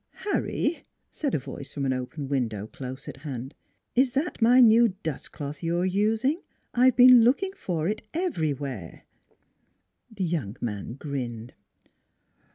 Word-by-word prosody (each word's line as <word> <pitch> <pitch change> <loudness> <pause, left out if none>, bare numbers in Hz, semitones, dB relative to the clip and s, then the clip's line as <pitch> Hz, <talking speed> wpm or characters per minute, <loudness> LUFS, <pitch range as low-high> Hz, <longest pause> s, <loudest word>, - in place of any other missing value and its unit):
" - - -52 0.2
Harry," 330 -3 -1 0.3
said 285 -4 -2
a - - +3
voice 135 +1 -7
from 140 -2 -3
an 130 - +1
open 130 +3 -5
window 115 -7 -1
close 130 +4 -8
at - - -7
hand, 135 -2 -6 0.2
" - - -50
is 255 0 +3
that 285 0 -2
my 245 +3 +6
new 235 -1 +7 0.2
dust 160 -4 -4
cloth 145 0 -6
you're 170 +1 0
using? 220 - +1 0.3
I've 250 0 +4
been 250 -1 +9
looking 280 +11 +2
for 170 - -2
it 210 +2 -2
everywhere." 145 - -3 1.1
The 205 -4 -4
young 150 - -2
man 105 -1 -4
grinned. 125 -5 -5
160 Hz, 150 wpm, -26 LUFS, -, 1.1 s, been